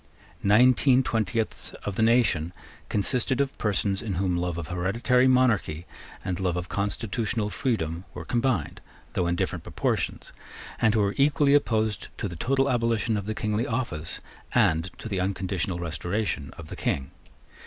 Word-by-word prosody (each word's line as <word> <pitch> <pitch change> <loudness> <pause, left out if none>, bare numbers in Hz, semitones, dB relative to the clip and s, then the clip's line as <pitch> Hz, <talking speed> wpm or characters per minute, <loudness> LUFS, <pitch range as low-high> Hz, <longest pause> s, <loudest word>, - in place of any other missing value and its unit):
Nineteen 125 +5 +5
twentieths, 110 -1 -1
of 100 - -3
the - - 0
nation 110 -8 +3 0.4
consisted 125 +5 +2
of 140 -1 0
persons 100 -2 0
in 105 -4 -3
whom 90 0 0
love 85 -1 -2
of 85 -1 -5
hereditary 115 +9 +2
monarchy 115 -11 +2 0.4
and 90 0 -2
love 90 -2 0
of 90 0 -4
constitutional 105 +1 -2
freedom 90 - -2
were - - -6
combined, 120 - 0 0.3
though 90 - 0
in 85 - +1
different - - -2
proportions, - - -2 0.5
and 110 -1 +4
who 110 - +3
were 100 0 +1
equally 140 0 +4
opposed 110 -7 +1
to - - -2
the 85 - -7
total 135 - +1
abolition 115 -3 +1
of 100 -1 -3
the 110 - -2
kingly 105 +2 -1
office 110 -10 -3 0.3
and 80 +3 +3
to - - -7
the 100 -4 -2
unconditional 95 -1 -1
restoration 85 -1 -2
of 80 -2 -10
the - - -6
King. 65 0 -2
105 Hz, 155 wpm, -26 LUFS, 90-120 Hz, 0.5 s, Nineteen